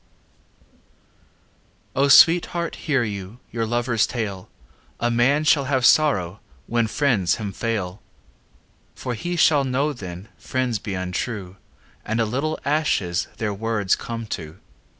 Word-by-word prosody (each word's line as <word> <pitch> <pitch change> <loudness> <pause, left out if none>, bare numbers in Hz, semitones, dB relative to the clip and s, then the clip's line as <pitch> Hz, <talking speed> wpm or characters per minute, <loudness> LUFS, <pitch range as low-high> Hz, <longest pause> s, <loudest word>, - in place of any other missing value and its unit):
XVIII - - -36 1.2
O 140 +2 +3
Sweetheart, 170 +4 +5
hear 135 -5 +2
you 100 +1 -6
Your 115 -1 -2
lover's 120 -1 +1
tale; 100 -6 -4 0.5
A 120 - +1
man 130 +6 +3
shall 150 -3 +3
have 130 -2 +1
sorrow 100 - +3 0.3
When 115 -1 +1
friends 110 -7 +1
him 105 -3 -5
fail. 100 -3 -3 0.9
For 125 - -4
he 175 +9 -3
shall 155 -4 +4
know 135 +3 0
then 95 -3 -9
Friends 130 -4 -1
be 100 -1 -5
untrue 95 +1 -4 0.5
And 110 +2 -2
a 115 - +3
little 140 +8 -2
ashes 140 - 0
Their 105 -3 -2
words 105 -2 0
come 115 -1 -6
to. 80 -3 -7
115 Hz, 130 wpm, -23 LUFS, 100-140 Hz, 1.2 s, Sweetheart